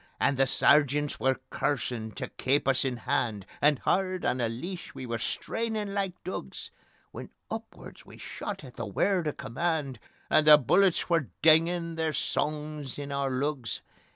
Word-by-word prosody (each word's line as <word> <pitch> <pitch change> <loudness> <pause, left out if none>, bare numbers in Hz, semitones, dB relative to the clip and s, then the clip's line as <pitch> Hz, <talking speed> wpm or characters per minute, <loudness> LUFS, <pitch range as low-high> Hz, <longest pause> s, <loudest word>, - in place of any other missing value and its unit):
And 140 - +2
the 135 0 +3
Sergeants 145 +2 +3
were 130 -1 +1
cursin' 120 -5 -1
tae - - -5
keep 135 +2 +1
us 135 -1 +3
in 130 -2 -1
hand, 110 -3 -1 0.2
And 145 -1 +5
hard 185 +4 0
on - - +1
the 120 -2 0
leash 175 +11 -6
we 130 - -6
were 115 -1 -3
strainin' 210 - -2
like 195 -3 -3
dugs, 120 - -6 0.4
When - - -8 0.2
upward - - -8
we - - -14
shot - - -6
at - - -12
the - - -4
word 185 -5 +1
o' - - +1
command, 140 -1 -2 0.3
And 155 - +3
the 150 -1 +11
bullets 180 - +3
were 165 -6 +1
dingin' 165 +1 +4
their 160 -1 0
songs 150 -2 -2
in 140 -1 -6
oor 140 -1 0
lugs. 130 -1 -2
145 Hz, 165 wpm, -28 LUFS, 130-170 Hz, 0.4 s, the